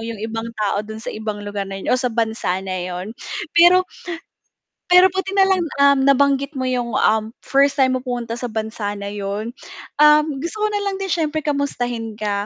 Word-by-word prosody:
yung 225 0 -5
ibang 225 +1 -4
tao 205 -1 0
dun 220 +1 -8
sa 220 - -6
ibang 215 -1 -5
lugar 205 -1 -4
na 195 - -5
yun 195 - -2
o 255 - +2
sa 250 - 0
bansa 220 -5 -1
na 185 -1 -3
yun. 180 +4 -5 0.4
Pero 350 +2 +6 1.1
pero 365 +1 +8
buti 380 +1 -3
nalang 385 -1 +4 0.5
nabanggit, 280 +1 +3
um, - - -8
mo 260 - -1
yung, 245 -2 -2
um, 220 +1 +1
first 275 +1 +3
time 260 0 +3
mo - - -7
pumunta 240 -2 -3
sa 245 - -4
bansa 220 -2 -3
na 200 -1 -6
yun, 205 +2 -4 0.5
um, 300 -1 +5
gusto 340 +9 -5
ko 425 - +3
nalang 400 -2 -2
din 385 - -3
siyempre 315 -2 0
kamustahin 245 -6 -2
ka. 205 -1 -2
240 Hz, 190 wpm, -20 LUFS, 215-300 Hz, 1.1 s, pero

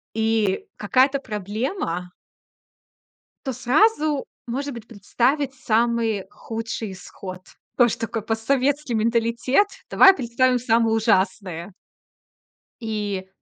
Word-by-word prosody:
и 220 -3 +1
какая-то 265 +6 +2
проблема 205 - -4 1.3
то 265 - -1
сразу, 300 - +2 0.2
может 275 +4 -3
быть, 235 -2 -9
представить 255 +6 0
самый 230 -4 +1
худший 225 -2 -5
исход. 185 0 -9 0.4
Тоже 240 -3 +4
такой 225 -1 -3
постсоветский 260 +4 0
менталитет. 235 - +2 0.2
Давай 385 0 +8
представим 250 -1 +1
самое 230 -1 +2
ужасное. 190 -4 0 1.1
И 205 -4 -3
230 Hz, 90 wpm, -23 LUFS, 210-255 Hz, 1.3 s, Давай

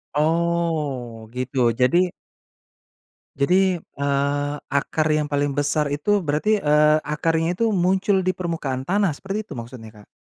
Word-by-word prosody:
Oh, 155 -7 -1
gitu 130 +2 -4 0.2
jadi 175 +8 +3 1.2
jadi, 180 +5 +2
eee, 140 0 -1 0.2
akar 150 +2 0
yang 150 0 +2
paling 145 -1 -1
besar 145 +1 +1
itu 195 +9 +1
berarti, 180 +7 +1
eee, 150 +1 +4
akarnya 165 +3 -1
itu 230 - +1
muncul 190 +1 +2
di 185 - -1
permukaan 160 -8 -3
tanah 200 +3 +2
seperti 195 +7 -4
itu 160 -11 -10
maksudnya, 115 -1 -9
Kak? - - -20
150 Hz, 130 wpm, -22 LUFS, 140-180 Hz, 1.2 s, eee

